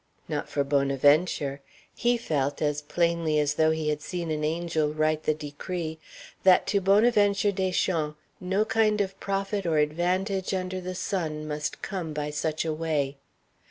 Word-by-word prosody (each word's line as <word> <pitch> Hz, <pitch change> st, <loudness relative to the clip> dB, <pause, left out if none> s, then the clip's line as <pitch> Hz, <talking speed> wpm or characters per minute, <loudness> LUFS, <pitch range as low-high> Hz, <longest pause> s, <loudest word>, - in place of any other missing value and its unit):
Not -, -, -3 dB
for 140 Hz, -, 0 dB
Bonaventure; 140 Hz, +1 st, +2 dB, 0.3 s
he 240 Hz, 0 st, +1 dB
felt, 145 Hz, -, -1 dB
as 150 Hz, -1 st, 0 dB
plainly 170 Hz, 0 st, +1 dB
as 150 Hz, -1 st, +2 dB
though 155 Hz, +1 st, +3 dB
he 160 Hz, -1 st, 0 dB
had 150 Hz, 0 st, -1 dB
seen 170 Hz, -1 st, -4 dB
an 155 Hz, -1 st, -2 dB
angel 160 Hz, -1 st, 0 dB
write 155 Hz, 0 st, 0 dB
the 155 Hz, -, +3 dB
decree, 160 Hz, +2 st, -5 dB, 0.4 s
that 185 Hz, -1 st, +5 dB
to 200 Hz, -, +3 dB
Bonaventure 205 Hz, 0 st, +4 dB
Deschamps 180 Hz, -5 st, 0 dB, 0.2 s
no 190 Hz, +4 st, 0 dB
kind 220 Hz, -1 st, +2 dB
of 195 Hz, -1 st, -2 dB
profit 195 Hz, -1 st, -2 dB
or 160 Hz, -2 st, +2 dB
advantage 185 Hz, +6 st, 0 dB
under 185 Hz, 0 st, -3 dB
the 185 Hz, 0 st, -5 dB
sun 155 Hz, -6 st, -3 dB
must 150 Hz, 0 st, -4 dB
come 175 Hz, -6 st, -4 dB
by 150 Hz, 0 st, -3 dB
such 155 Hz, +2 st, -2 dB
a 160 Hz, -, 0 dB
way. 150 Hz, -3 st, -1 dB
160 Hz, 160 wpm, -27 LUFS, 150-190 Hz, 0.4 s, that